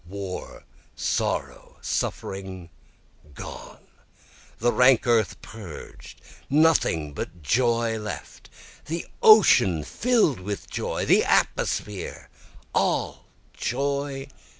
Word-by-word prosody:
War, 95 0 -7 0.3
sorrow, - - -2
suffering 95 -3 -4 0.6
gone - - -10 0.7
the 120 +1 +1
rank 125 -1 +5
earth 115 -6 +2
purged 100 -8 -11 0.3
nothing 140 - +3
but 85 +3 -7
joy 115 - +1
left! 105 -1 -8 0.4
The 165 +2 -4 0.2
ocean 100 - +6
fill'd 220 - +1
with 100 +2 -5
joy - - -2
the - - +5
atmosphere 105 -3 -1 0.4
all - - 0 0.3
joy! 140 +1 -2
115 Hz, 85 wpm, -25 LUFS, 95-140 Hz, 0.7 s, ocean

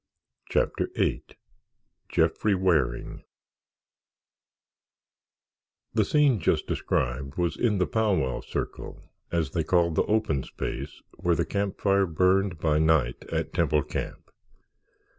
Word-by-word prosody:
CHAPTER - - 0
VIII - - 0 0.9
JEFFREY 105 -2 +2
WARING 90 -8 0 2.7
The 110 - +3
scene 145 -3 +3
just 80 - +1
described 65 +3 -2
was 85 -1 0
in 110 -4 +1
the 90 - +2
Pow 105 +5 +1
wow 65 -6 -1
Circle, - - -5 0.3
as 85 -2 0
they 80 - 0
called 85 0 +2
the - - +2
open 105 -10 +1
space 65 +1 -6
where 85 -1 +1
the - - 0
camp 100 -1 -2
fire 100 -1 +3
burned 90 +2 +2
by 75 -1 +1
night 80 -6 +2
at - - -2
Temple 75 -2 +2
Camp. - - -6
85 Hz, 120 wpm, -27 LUFS, 75-100 Hz, 2.7 s, The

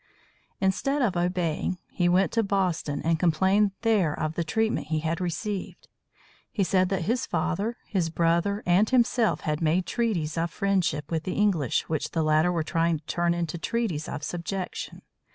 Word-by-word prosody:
Instead 270 +9 +1
of 200 -6 +1
obeying, 175 0 -1
he 175 -1 +1
went 185 +2 +3
to 230 - +2
Boston 185 -8 -1
and 165 0 +1
complained 190 +5 +3
there 205 -10 +2
of 155 0 -1
the 170 - -1
treatment 220 +2 0
he 155 0 -1
had 165 +2 -2
received. 190 +3 -4 0.6
He 205 - 0
said 185 0 +2
that 190 -2 -1
his 235 +7 0
father, 215 +6 -1
his 180 -6 -1
brother, 170 +5 +1
and 185 +5 +4
himself 235 -8 +2
had 150 0 -2
made 170 +3 +2
treaties 175 -10 -1
of 170 +1 0
friendship 170 -6 0
with 160 -1 0
the 185 - -3
English 185 - +1
which 155 -2 -2
the 165 - +1
latter 155 +3 +3
were 170 -2 0
trying 165 +1 +1
to 150 - -18
turn 170 +1 0
into 170 -1 -3
treaties 175 -5 -2
of 145 - -5
subjection. 180 +3 -5
175 Hz, 170 wpm, -26 LUFS, 160-200 Hz, 0.6 s, and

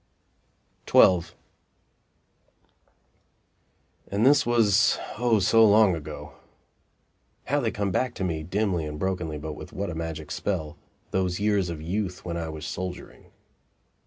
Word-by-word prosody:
XII 90 -2 +6 2.8
And 100 +4 0
this 140 -2 +5
was, 115 -5 +3 0.2
O 120 -2 +3
so 110 +3 +4
long 105 -2 +6
ago! 80 - -8 1.1
How - - +1
they - - 0
come 100 -2 -2
back 125 +5 -1
to - - -4
me 80 -4 -2
dimly 90 -1 -1
and 75 0 -6
brokenly, 90 -3 -2
but 75 +1 -6
with - - -10
what 100 -2 -3
a - - -5
magic 80 -2 -5
spell 80 -7 -3 0.4
those 90 -1 -1
years 100 -3 +1
of 80 -2 -6
youth 95 +2 -3
when 85 -1 -3
I 85 -1 -3
was 80 0 -7
soldiering! 90 0 -7
90 Hz, 130 wpm, -26 LUFS, 80-105 Hz, 2.8 s, XII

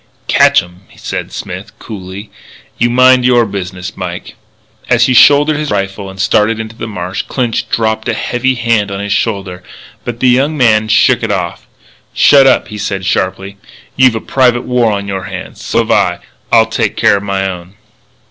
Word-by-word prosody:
"Catch - - +4
'em," 90 +1 -16
said - - -5
Smith, - - -8
coolly. 100 0 -9 0.5
"You 120 - +2
mind 130 +1 +4
your 120 -1 +3
business, 95 -3 -6
Mike." - - -6 0.6
As 120 -1 +4
he 130 - +1
shouldered 145 +4 +5
his 150 -1 -3
rifle 100 0 -3
and 95 0 -12
started 105 +3 +1
into 110 0 -7
the 115 - -6
marsh, 95 -3 -4
Clinch 120 -4 -2
dropped 110 -1 -1
a - - 0
heavy 130 +1 -1
hand 115 -4 0
on 100 0 -5
his 100 0 -2
shoulder; 95 -5 -2 0.4
but 120 -1 -5
the 130 - +2
young 140 +5 +1
man 110 -4 +3
shook 110 0 +3
it - - -2
off. - - -4 0.5
"Shut 140 -2 +6
up," 130 - +2
he 105 -1 -7
said 95 -2 -3
sharply. 95 +2 -2 0.4
"You've 130 -2 +4
a 110 - -3
private 125 -2 +1
war 125 -3 +1
on 100 -1 -3
your 95 -2 -4
hands. - - -8
So - - -2
have - - +1
I. - - +1 0.3
I'll - - +5
take - - -2
care 100 - +3
of - - -5
my 100 -1 -2
own." 90 0 -8
110 Hz, 185 wpm, -13 LUFS, 95-120 Hz, 0.6 s, Shut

